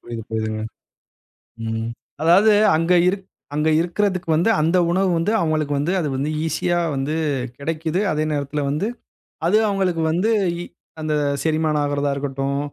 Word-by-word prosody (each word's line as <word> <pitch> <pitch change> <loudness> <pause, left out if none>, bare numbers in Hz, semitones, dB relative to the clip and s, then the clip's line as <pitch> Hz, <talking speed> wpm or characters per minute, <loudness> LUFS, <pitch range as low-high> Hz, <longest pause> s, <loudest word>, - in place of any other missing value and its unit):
புரிது 115 -1 -7
புரிதுங்க. 110 -1 -2 1.1
ம் 115 0 -2 0.3
அதாவது 180 +7 +5 0.2
அங்க 165 +3 +2
இருக் 190 +1 -1 0.3
அங்க 150 +1 +2
இருக்கறதுக்கு, 185 +1 -1
வந்து 170 +8 +2
அந்த 165 +4 +2
உணவு 190 +1 +2
வந்து 175 +6 0
அவங்களுக்கு 155 -3 0
வந்து 150 +5 0
அது 160 - -1
வந்து 140 +3 -1 0.2
ஈசியா 175 +2 0 0.2
வந்து 135 +3 -2 0.4
கிடைக்குது. 160 +3 -2
அதே 155 0 0
நேரத்துல 145 0 -2
வந்து 150 +9 -1 0.6
அது 200 +5 +4
அவங்களுக்கு 190 -4 0
வந்து 180 +7 +1 0.3
இ - - -4 0.4
அந்த 155 0 -1 0.3
செரிமானம் 155 -1 +1
ஆகறதா 145 0 0
இருக்கட்டும். 140 0 -2
155 Hz, 140 wpm, -21 LUFS, 145-175 Hz, 1.1 s, அதாவது